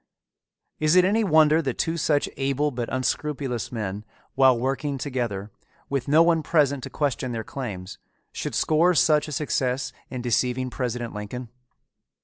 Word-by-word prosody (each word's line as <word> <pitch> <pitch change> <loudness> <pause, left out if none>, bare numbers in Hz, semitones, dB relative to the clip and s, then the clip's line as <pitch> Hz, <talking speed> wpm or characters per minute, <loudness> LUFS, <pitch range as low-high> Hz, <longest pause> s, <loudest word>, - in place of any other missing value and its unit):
Is 155 +2 +3
it 180 0 +6
any 215 +4 +2
wonder 155 -3 +5
that 135 -5 -3
two 165 - 0
such 150 -3 +1
able 140 +2 0
but 120 -2 -4
unscrupulous 130 -3 -2
men, 105 -3 -4 0.3
while 130 -2 +5
working 135 +3 -2
together, 120 -7 -3 0.4
with 140 -1 -1
no 155 +4 +6
one 165 -1 +3
present 145 -3 +2
to - - -7
question 135 -4 -2
their 110 -1 -3
claims, 100 -8 -6 0.3
should - - -4
score 170 +3 +3
such 150 0 +3
a - - -6
success 135 -3 -1 0.2
in 125 -2 -5
deceiving 125 +1 0
President 120 -2 -3
Lincoln? 110 +4 -6
135 Hz, 150 wpm, -25 LUFS, 120-150 Hz, 0.4 s, it